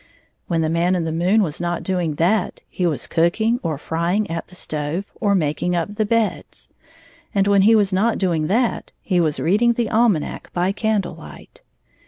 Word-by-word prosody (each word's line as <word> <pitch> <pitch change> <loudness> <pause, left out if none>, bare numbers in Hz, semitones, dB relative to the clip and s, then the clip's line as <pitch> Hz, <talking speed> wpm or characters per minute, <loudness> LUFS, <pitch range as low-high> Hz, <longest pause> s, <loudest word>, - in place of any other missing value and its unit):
When 165 -2 0
the 160 - +1
Man 170 +2 +1
in 175 - -1
the 165 - -2
moon 180 +7 +2
was 160 -3 -3
not 175 0 -2
doing 175 -5 -1
that, 180 +5 0
he 180 - -1
was 155 -4 -2
cooking 220 +8 +1
or 160 -4 -2
frying 170 +8 -1
at 165 -1 -4
the 180 - -14
stove 155 +2 -3
or 200 -3 0
making 170 +1 0
up 175 +4 -2
the 210 0 -1
beds; 230 -1 -2 0.7
and 195 -1 +3
when 200 -1 +4
he 220 +3 +5
was 205 -3 +2
not 215 +4 +2
doing 165 -5 0
that, 230 +6 0
he 185 -3 +1
was 155 -3 0
reading 215 +7 +3
the 230 -2 -1
ahnanac 220 -8 0
by 180 +2 +1
candle 205 -3 -1
light. 160 0 -13
180 Hz, 190 wpm, -21 LUFS, 165-210 Hz, 0.7 s, he